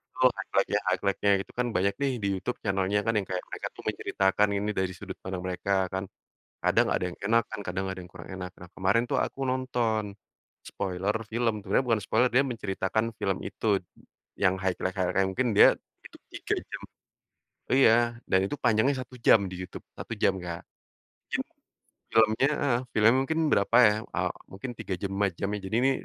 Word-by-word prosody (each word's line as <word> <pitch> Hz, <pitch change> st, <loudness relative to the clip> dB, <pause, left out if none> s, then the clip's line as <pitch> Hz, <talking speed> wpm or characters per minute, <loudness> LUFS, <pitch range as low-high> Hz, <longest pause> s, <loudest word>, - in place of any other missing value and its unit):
Betul, -, -, +5 dB
highlight-nya -, -, 0 dB
highlight-nya 100 Hz, +1 st, +1 dB
itu 95 Hz, -, -7 dB
kan 125 Hz, 0 st, 0 dB
banyak 100 Hz, +2 st, +2 dB
nih 140 Hz, -1 st, +2 dB
di -, -, +1 dB
YouTube 120 Hz, +6 st, -4 dB
channel-nya 95 Hz, 0 st, 0 dB
kan 115 Hz, -, +2 dB
yang 100 Hz, -, +1 dB
kayak 90 Hz, -1 st, -2 dB
mereka -, -, -5 dB
tuh -, -, -13 dB
menceritakan 95 Hz, +2 st, +1 dB
ini 105 Hz, +1 st, -1 dB
dari 95 Hz, -1 st, 0 dB
sudut -, -, -8 dB
pandang 95 Hz, -1 st, -4 dB
mereka 95 Hz, +1 st, 0 dB
kan. 95 Hz, +1 st, -3 dB, 0.5 s
Kadang -, -, +2 dB
ada -, -, 0 dB
yang 90 Hz, -, -5 dB
enak 115 Hz, +3 st, +3 dB
kan 110 Hz, -, -7 dB
kadang 95 Hz, 0 st, -3 dB
ada 95 Hz, -1 st, -4 dB
yang 90 Hz, -, -12 dB
kurang 90 Hz, 0 st, -12 dB
enak. 90 Hz, -1 st, -5 dB
Nah, 90 Hz, -1 st, -12 dB
kemarin 95 Hz, +5 st, +2 dB
tuh -, -, -1 dB
aku -, -, -4 dB
nonton 115 Hz, -5 st, -1 dB, 0.5 s
spoiler 95 Hz, +1 st, -2 dB, 0.2 s
film, 115 Hz, -2 st, 0 dB
sebenernya 105 Hz, +6 st, +1 dB
bukan 115 Hz, -3 st, +1 dB
spoiler, 120 Hz, +5 st, +2 dB
dia 130 Hz, -, +6 dB
menceritakan 110 Hz, -2 st, -2 dB
film 95 Hz, -1 st, 0 dB
itu 105 Hz, -3 st, 0 dB, 0.6 s
yang 95 Hz, 0 st, +3 dB
highlight-highlight-nya 95 Hz, 0 st, 0 dB
mungkin 120 Hz, +5 st, 0 dB
dia -, -, +10 dB, 0.4 s
itu -, -, -13 dB, 0.2 s
3 -, -, -2 dB
jam -, -, -6 dB, 0.9 s
iya, 130 Hz, -4 st, +6 dB, 0.4 s
dan 95 Hz, -, +4 dB
itu 145 Hz, -, -3 dB
panjangnya 125 Hz, +4 st, +3 dB
1 125 Hz, -, -14 dB
jam 110 Hz, -, +6 dB
di 90 Hz, -, -6 dB
Youtube -, -, -10 dB
1 -, -, -5 dB
jam 95 Hz, -, +2 dB
Kak. 85 Hz, -1 st, -6 dB, 0.7 s
Mungkin -, -, -1 dB, 0.7 s
film-nya 110 Hz, +4 st, +4 dB
heeh, 125 Hz, -4 st, +2 dB, 0.2 s
film-nya 110 Hz, +1 st, +6 dB
mungkin 160 Hz, +4 st, -1 dB
berapa 100 Hz, +4 st, +3 dB
ya, 105 Hz, -, +3 dB
eee, -, -, -1 dB, 0.2 s
mungkin 100 Hz, +7 st, -6 dB
3 95 Hz, -, -4 dB
jam 100 Hz, -1 st, -3 dB
5 100 Hz, 0 st, +2 dB
jam 100 Hz, -, -2 dB
ya. -, -, -4 dB
Jadi, 110 Hz, -, -2 dB
ini, 135 Hz, -, +4 dB
100 Hz, 185 wpm, -28 LUFS, 95-115 Hz, 0.9 s, dia